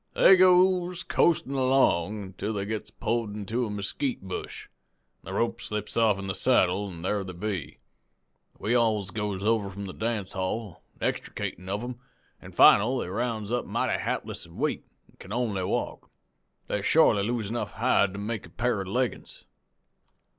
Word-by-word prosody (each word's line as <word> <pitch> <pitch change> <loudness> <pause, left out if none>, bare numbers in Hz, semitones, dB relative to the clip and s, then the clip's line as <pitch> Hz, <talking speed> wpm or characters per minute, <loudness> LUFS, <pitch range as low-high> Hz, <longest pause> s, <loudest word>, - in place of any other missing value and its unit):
"They 190 - +8
goes 180 -1 +4
coastin' 155 -5 +2
along 130 -7 +2
ontil 105 +4 -3
they 100 -1 -2
gets 105 0 -4
pulled 110 -1 -2
into 110 +4 -2
a - - -6
mesquite 105 +5 -3
bush, 95 -1 -6 0.5
an' - - -25
the - - -6
rope 115 +1 -1
slips 105 -3 -4
offen 105 -4 +2
the 95 - -2
saddle, 100 -4 +2
an' 85 -2 -9
thar 100 +1 0
they 95 -1 -7
be. 90 -3 -4 0.8
We 110 - -1
alls 110 -5 +2
goes 100 -1 -3
over 110 -2 +1
from 100 +1 -7
the 95 - -7
dance 110 -4 -2
hall, 95 +1 -4 0.2
extricatin' 90 +2 -3
of 100 +3 -2
'em, 125 0 -6 0.4
an' - - -12
final 115 +6 +6
they 90 - -3
rounds 110 0 -2
up 120 0 -1
mighty - - 0
hapless - - -4
an' - - -15
weak, - - -1 0.2
an' - - -26
can 95 - -11
only 110 -5 -1
walk. - - -3 0.6
They - - -2
shorely 100 - +4
lose 110 0 -2
enough 120 - -3
hide 110 -4 +2
to 100 - -6
make 105 -2 -4
a - - -17
pair 115 +2 -1
of 95 - -6
leggin's. 125 +5 -3
105 Hz, 170 wpm, -27 LUFS, 100-120 Hz, 0.8 s, They